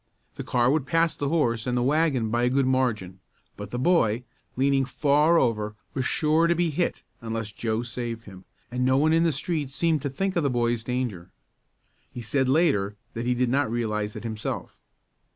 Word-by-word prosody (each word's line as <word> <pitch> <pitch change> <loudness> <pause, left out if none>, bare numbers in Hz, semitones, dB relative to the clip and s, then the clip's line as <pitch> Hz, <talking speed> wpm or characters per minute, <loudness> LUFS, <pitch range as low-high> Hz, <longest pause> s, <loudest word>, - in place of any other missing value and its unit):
The - - -6
car 125 0 +2
would 145 -2 0
pass 165 +1 +2
the 145 - -2
horse 120 -8 0
and 125 0 0
the 120 - +1
wagon 135 -5 +1
by 120 +1 +1
a 125 - +3
good 135 +1 +2
margin, 120 -8 0 0.4
but 105 -1 -8
the 120 - -4
boy, 125 -7 +2 0.3
leaning 135 +1 +2
far 145 +5 +3
over, 105 -6 0 0.2
was 130 -1 -1
sure 160 +2 +2
to 170 - +2
be 170 -1 +1
hit 170 +4 -1 0.2
unless 115 -2 -4
Joe 110 +2 -2
saved 120 -1 -5
him, 95 -3 -13 0.3
and 125 +1 -1
no 130 +1 +3
one 155 +3 +3
in 165 - +4
the 165 - +3
street 150 0 -2
seemed 160 +1 0
to 140 - -2
think 190 +8 -2
of 170 - +2
the 140 - +1
boy's 120 -2 0
danger. 120 -8 -3 0.8
He 120 - -7
said 130 +4 0
later 130 - +2 0.2
that 115 +1 -4
he 125 - +2
did 125 0 +1
not 135 0 +1
realize 105 -3 -2
it - - -7
himself. 110 -2 -5
125 Hz, 200 wpm, -26 LUFS, 115-150 Hz, 0.8 s, in